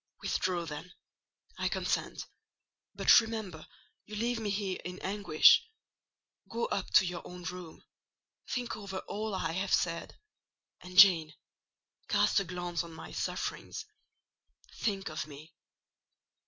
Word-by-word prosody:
"Withdraw, 180 -3 0
then,—I 160 +4 -8
consent; - - -2 0.7
but - - +7
remember, 215 -8 -6 0.4
you 215 - -8
leave 235 +2 0
me 215 -2 -2
here 195 -2 -2
in 180 +1 -6
anguish. 190 -5 +5 0.9
Go 235 +1 -1
up 195 - -2
to - - +7
your 175 -1 -4
own 180 0 -10
room; 175 -1 -8 0.6
think 245 -1 -2
over 195 -2 -6
all 215 0 -3
I 165 -3 -1
have 190 +3 +2
said, 170 -1 -3 0.6
and, 180 0 -10
Jane, 170 -5 +7 0.7
cast - - +3
a - - -1
glance 175 0 -3
on 170 -1 -10
my 160 - -9
sufferings—think 235 - -6
of 155 - -4
me." 155 +3 -12
185 Hz, 120 wpm, -31 LUFS, 170-205 Hz, 0.9 s, but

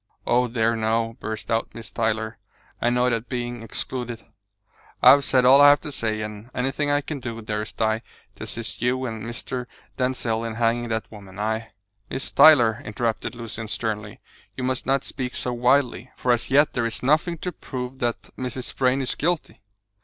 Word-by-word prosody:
Oh, 125 +1 +3
dear, 115 -1 +1
no!" 115 +1 0
burst 110 +1 -5
out 115 0 -1
Miss 110 -5 -7
Tyler, 110 +1 -1 0.4
annoyed 125 +1 +2
at 115 +1 -3
being 120 -1 -3
excluded. 120 +1 -5 0.8
"I've 140 0 +8
said 130 -2 +3
all 135 +3 +8
I 145 - +10
have 145 - +5
to 150 - -5
say, 110 -5 -2
and 105 +2 -7
anything 135 +3 0
I 145 0 +3
can 145 0 -5
do, 115 -2 -5
dearest 105 0 -4
Di, 110 0 +1 0.4
to - - -7
assist 115 -1 -5
you 130 +2 +1
and 110 -3 -4
Mr. 120 +1 -5 0.3
Denzil 125 -3 0
in 115 -1 -4
hanging 120 +1 +1
that 110 -1 -3
woman, 100 -3 -12
I 110 +2 -2 0.2
" 100 0 -44
"Miss 135 - -4
Tyler," 125 -6 +7
interrupted 115 +2 -2
Lucian 115 -1 -6
sternly, 105 -2 -3 0.4
"you 130 - -3
must 130 -1 -1
not 135 0 +2
speak 125 -2 -5
so 125 - -1
wildly, 125 +1 +2
for 125 - +1
as 120 - +1
yet 145 +3 +4
there 115 -2 0
is 115 +1 -6
nothing 155 +5 +2
to 180 +3 -4
prove 130 -4 -6
that 120 -1 -1
Mrs. 130 0 -4
Vrain 130 +1 +2
is 130 - -1
guilty." 170 +1 -2
120 Hz, 185 wpm, -24 LUFS, 110-130 Hz, 0.8 s, I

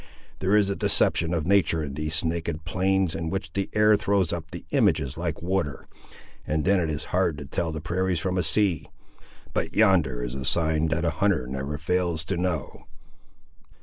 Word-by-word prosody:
There 95 +2 +2
is 105 -2 +4
a - - -1
deception 85 -3 +1
of 85 -3 -1
natur' 90 -4 +3
in 70 -2 -5
these 75 +3 -1
naked 80 -1 -3
plains, 95 +1 +1
in 80 0 -3
which 80 -3 -4
the 100 -1 -2
air 105 0 +6
throws 100 -4 +1
up 80 -2 -5
the - - -9
images 70 +1 +2
like 85 -2 -4
water, 90 -6 -2 0.6
and 75 0 0
then 100 0 +4
it 85 -2 0
is 75 0 -3
hard 90 -4 +2
to 70 - -7
tell 80 +4 -2
the 80 -1 -5
prairies 90 +2 0
from 90 +2 -1
a 90 - +2
sea. 90 -1 +1 0.7
But - - -2
yonder 85 - +3
is - - -4
a 65 0 -4
sign 80 +1 +1
that 80 +2 0
a 85 - +2
hunter 85 -4 +1
never 65 +3 -4
fails 85 0 -1
to - - -2
know!" 85 -5 -3
85 Hz, 190 wpm, -26 LUFS, 75-95 Hz, 0.7 s, air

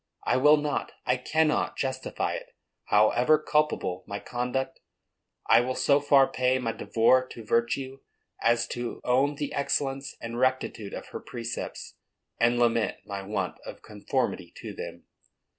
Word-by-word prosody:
I - - +1
will 150 +4 +6
not, 145 -1 -2
I 125 - +3
cannot, 155 +4 +1
justify 130 -1 -2
it. - - -8 0.3
However 120 +8 +4
culpable 150 -12 0
my 100 -1 -4
conduct, 125 +3 -3 0.7
I 115 - +6
will 130 +1 -2
so 140 0 +3
far 140 -2 +5
pay 130 0 +1
my 120 -3 -1
devoir 130 +3 +3
to 115 -3 -10
virtue 130 +4 0 0.4
as 115 0 +2
to 120 -1 -4
own 135 +4 +2
the 145 0 -4
excellence 135 -1 -1
and 115 +1 -5
rectitude 130 -5 0
of - - -8
her - - -6
precepts, 120 -1 -6 0.4
and 120 +1 +3
lament 115 -2 +2
my 100 -1 -5
want 95 -2 -3
of - - -10
conformity 105 -3 -2
to - - -7
them. - - -8
125 Hz, 145 wpm, -27 LUFS, 115-135 Hz, 0.7 s, will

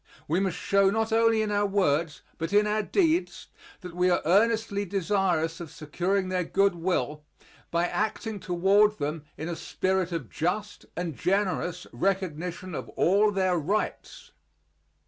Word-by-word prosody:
We 165 +4 +1
must 190 -3 -1
show 200 +1 +3
not 220 +2 0
only 225 -1 +3
in 210 - -2
our 205 0 +2
words 170 -6 0 0.2
but 165 +2 -3
in 210 +1 +5
our 210 +1 +1
deeds 335 - 0 0.3
that 180 -1 -9
we 180 +1 +2
are 175 - +1
earnestly 210 +3 +2
desirous 185 -4 0
of 170 -3 -7
securing 185 +6 -2
their 185 -1 0
good 195 +3 +2
will 155 -4 -2 0.5
by 170 +1 +1
acting 215 +2 -2
toward 195 +4 +3
them 150 +1 -3
in 160 - -5
a 170 - -3
spirit 185 +1 -1
of 165 -8 -3
just 200 +6 -3
and 170 -4 -3
generous 180 - -1
recognition 180 -1 -2
of - - -5
all 200 +4 +4
their 185 -3 +1
rights. 200 +8 -3
185 Hz, 150 wpm, -27 LUFS, 170-205 Hz, 0.5 s, in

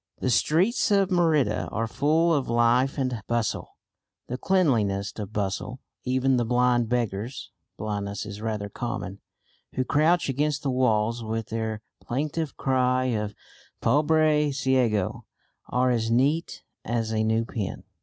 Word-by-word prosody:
The 130 - -1
streets 180 - +2
of 200 -2 +3
Merida 165 -6 +2
are 115 - -1
full 155 +8 +2
of 140 -4 0
life 120 +4 +3
and 130 -5 -1
bustle, 120 -2 -2 0.5
the 125 - -4
cleanliest 115 - +1
of 105 -1 -5
bustle. 105 +5 -3 0.3
Even 130 +1 +2
the 120 - +2
blind 120 0 +2
beggars 120 0 -2 0.3
(blindness 100 -1 -3
is 100 0 -8
rather 110 -2 -2
common) 100 -2 -5 0.6
who 130 - +1
crouch 160 +5 +2
against 145 +1 0
the 135 - 0
walls, 115 -2 +1
with 110 0 -3
their 110 -1 -3 0.2
plaintive 150 +4 -3
cry 130 -1 +1
of 105 -1 -3 0.4
"Pobre 150 +2 +3
Ciego," 130 -8 0 0.4
are 125 0 +2
as 115 -2 0
neat 140 +8 +1 0.2
as 115 -1 -2
a 110 0 +1
new 110 +1 +1
pin. 105 -5 -4
125 Hz, 135 wpm, -26 LUFS, 110-140 Hz, 0.6 s, of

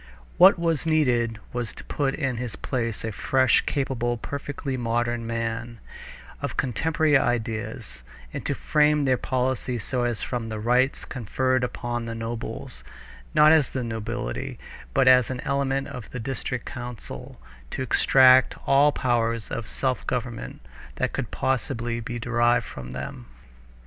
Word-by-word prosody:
What 185 +2 +9
was 165 -2 0
needed 120 -8 +2 0.2
was 120 -2 -3
to - - -11
put 135 -2 -1
in 135 -5 -1
his 120 -2 -4
place 115 -4 -3
a 110 - -2
fresh, 130 +5 +3
capable, 120 -4 -1
perfectly 140 +2 -4
modern 120 -1 -1
man, 115 0 -3 0.6
of - - -4
contemporary 150 +3 +2
ideas, 110 - -2 0.3
and - - -4
to - - 0
frame 150 -1 +3
their 130 -1 +4
policy 130 -1 -1
so 120 +3 -2
as 120 -2 -1
from 120 -3 -3
the 110 -1 -4
rights 125 +5 +2
conferred 130 +2 0
upon 120 -1 -3
the 115 0 -5
nobles, 115 - -6 0.5
not 150 +1 +7
as 155 -5 +5
the 130 - -3
nobility, 110 - -4 0.4
but 135 -1 +4
as 125 -2 +6
an 130 -1 -3
element 135 0 0
of 125 -4 -8
the 125 - -6
district 125 0 -4
council, 120 - -8 0.3
to 130 - -3
extract 130 0 +6
all 140 +2 +5
the - - -7
powers 115 -2 0
of 115 - -4
self 130 -2 -2
government 120 - -4 0.3
that - - -1
could - - -3
possibly 120 -3 -1
be 120 +1 -5
derived 120 +1 +2
from 65 -2 -8
them. 65 -2 -7
125 Hz, 150 wpm, -25 LUFS, 115-135 Hz, 0.6 s, What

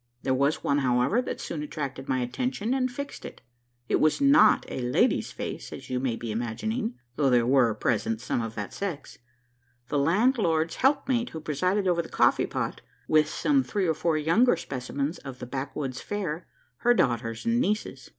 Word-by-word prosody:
There 130 - +1
was 140 +3 +1
one, 140 +1 +2
however, 130 - +2
that 255 - -5
soon 155 - -4
attracted 140 -3 -5
my 130 -1 +1
attention, 225 - -2
and 260 -1 +1
fixed 280 +3 -7
it. - - -9 0.5
It - - +2
was 155 - +3
not 275 -6 +5
a - - -4
lady's 125 0 +1
face, - - -6
as - - -9
you 125 - 0
may 125 -3 -1
be 115 -1 -5
imagining; 215 - -2 0.2
though 140 -2 +3
there 120 -2 +4
were 125 -3 +3
present 110 0 0
some 120 0 -2
of 115 -1 -5
that 105 -2 -5
sex 185 -7 -5 0.7
the 145 - +1
landlord's 170 - +2
helpmate 265 -3 +2
who 160 - -7
presided 180 +6 0
over 175 -1 +2
the 165 - -11
coffee - - +3
pot, - - -3 0.3
with 155 -1 +4
some 280 - +2
three 205 -6 -1
or 160 - +2
four 160 +1 0
younger 175 +11 +4
specimens 140 +1 -4
of 135 -2 -8
the 125 - -7
backwoods 135 0 -4
fair 180 -5 -4 0.3
her 240 0 +3
daughters 115 - 0
and 235 +1 +2
nieces. 215 -3 -2
155 Hz, 180 wpm, -27 LUFS, 130-215 Hz, 0.7 s, not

